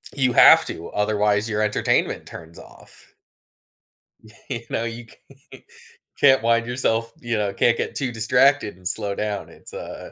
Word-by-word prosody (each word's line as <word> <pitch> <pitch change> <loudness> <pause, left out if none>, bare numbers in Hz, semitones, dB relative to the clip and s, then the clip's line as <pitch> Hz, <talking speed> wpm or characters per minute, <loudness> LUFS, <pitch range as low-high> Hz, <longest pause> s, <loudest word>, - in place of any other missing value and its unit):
You 135 -3 +1
have - - +7
to, 85 - -7
otherwise 105 +1 0
your 105 -1 -1
entertainment 105 -1 -1
turns 80 0 -12
off. - - -14 1.4
You 115 - -4
know, 115 - -2
you 115 +1 -7 0.5
c - - -15 0.5
can't 135 -4 +4
wind 115 0 +2
yourself 115 -2 -1
you 115 -2 -3
know, 100 -2 -2
can't 120 +4 +2
get - - -4
too 130 -3 -2
distracted 125 0 +2
and 90 -1 -7
slow 100 -1 -1
down, 105 -1 -4
it's, - - -15
uh - - -9
110 Hz, 155 wpm, -22 LUFS, 105-120 Hz, 1.4 s, have